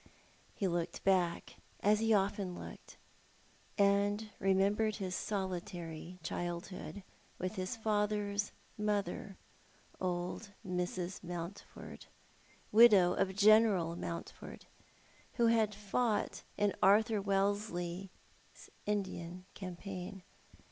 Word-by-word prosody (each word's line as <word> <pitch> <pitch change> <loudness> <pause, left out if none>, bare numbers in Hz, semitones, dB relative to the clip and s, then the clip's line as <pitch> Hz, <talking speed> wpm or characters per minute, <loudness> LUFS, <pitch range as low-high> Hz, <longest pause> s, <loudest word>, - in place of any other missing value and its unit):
He 195 - 0
looked 170 -1 -2
back, 180 -3 +1 0.2
as 210 +1 +4
he 225 0 +2
often 195 -3 +1
looked, - - -10 0.8
and 205 +1 +2
re 195 - +2
membered 210 +3 +2
his 185 -2 -3
solitary 180 -4 -4
childhood 175 +4 -4 0.3
with 185 0 -3
his 185 +2 -3
father's 210 -1 0 0.3
mother, 205 -2 -1 0.6
old 180 +3 -3
Mrs. 180 0 -3
Mountford, 175 +2 -7 0.6
widow 205 -5 +8
of 190 0 0
General 205 -5 +5
Mountford, 170 -1 -7 0.7
who 235 - +2
had 220 -2 +3
fought 210 +2 0 0.2
in 205 -1 +2
Arthur 215 +2 +5
AVellesley's 195 -2 -3 0.2
Indian 185 -3 -3
campaign. 185 0 -7
195 Hz, 95 wpm, -34 LUFS, 180-210 Hz, 0.8 s, widow